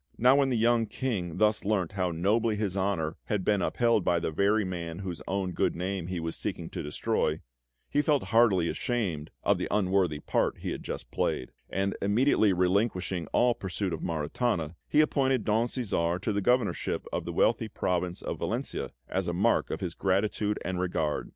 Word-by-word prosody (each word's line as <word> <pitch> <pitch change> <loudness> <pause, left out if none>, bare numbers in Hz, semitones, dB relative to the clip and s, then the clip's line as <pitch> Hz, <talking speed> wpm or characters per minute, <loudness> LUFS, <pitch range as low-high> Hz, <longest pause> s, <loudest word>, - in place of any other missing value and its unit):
Now 125 +4 +5
when 140 -1 +3
the 125 - +1
young 115 0 +3
King 100 -12 -3
thus 105 0 +3
learnt 100 -5 0
how 90 -2 0
nobly 105 +7 +1
his 105 -3 -2
honour 95 -5 -1
had 105 -3 -1
been 105 -2 +2
upheld 115 +2 +2
by 85 -1 +2
the 80 - -2
very 100 +5 +2
man 85 -3 -4
whose 90 -3 -5
own 95 -1 -1
good - - 0
name 90 0 -3
he 90 -1 -3
was 80 0 -3
seeking - - -4
to - - -4
destroy, 75 - -1 0.5
he 145 - +2
felt 150 -3 +2
heartily 105 -7 +5
ashamed 95 - -2
of - - +2
the - - -2
unworthy 95 -5 +2
part - - 0
he - - -4
had - - -4
just - - -6
played; 65 - -1 0.2
and 95 0 -1
immediately 110 0 +3
relinquishing 90 -1 0
all 120 0 +3
pursuit 95 -2 -3
of 80 - -4
Maritana, 80 +1 -1
he 150 - +4
appointed 135 -5 +1
Don 110 +2 +2
Cæsar 90 -9 -1
to 110 +1 -1
the 100 - 0
Governorship 125 +1 +1
of - - -1
the - - -3
wealthy - - +2
province 90 -1 -2
of - - -4
Valentia, - - -3 0.2
as 95 -1 -2
a 85 - -1
mark 100 +7 +2
of - - -4
his 90 -3 -3
gratitude 105 +3 0
and 90 0 -2
regard. 80 -4 -1
95 Hz, 190 wpm, -29 LUFS, 90-110 Hz, 0.5 s, Now